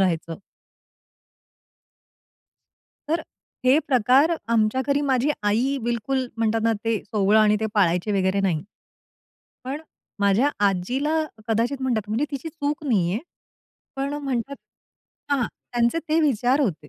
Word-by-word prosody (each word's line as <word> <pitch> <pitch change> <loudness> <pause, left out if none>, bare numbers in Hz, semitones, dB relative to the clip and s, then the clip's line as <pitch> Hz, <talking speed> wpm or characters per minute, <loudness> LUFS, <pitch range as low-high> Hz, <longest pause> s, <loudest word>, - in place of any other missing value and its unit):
राहायचं. 170 -3 0 2.7
तर 325 +2 +1 0.4
हे 260 +4 +6
प्रकार 265 +5 +3
आमच्या 225 +2 +2
घरी, 285 0 +2
माझी 270 -1 +1
आई 235 +7 +1
बिलकुल 240 +3 -1
म्हणतात 225 0 +1
ना, 230 0 +3
ते 225 -2 +1
सोवळं 210 0 +2
आणि 210 0 +4
ते 220 - 0
पाळायचे 185 0 +2
वगैरे 190 0 +1
नाही. 175 -5 0 1.0
पण 270 +4 -4
अ, 320 - -20 0.3
माझ्या 205 +8 +3 0.2
आजीला 255 - -1 0.3
कदाचित 240 +5 0
म्हणतात, 225 -5 -1
म्हणजे 225 +7 0
तिची 280 +2 -5
चूक 300 -1 -3
नाहीये, 195 -6 +1 0.8
पण 275 +1 -2
म्हणतात 275 -2 -3 0.7
हां, 270 -5 +2 0.3
त्यांचे 240 +6 +2
ते 315 +1 +3
विचार 265 -1 +2
होते. 160 - -2
235 Hz, 125 wpm, -24 LUFS, 210-280 Hz, 2.7 s, हे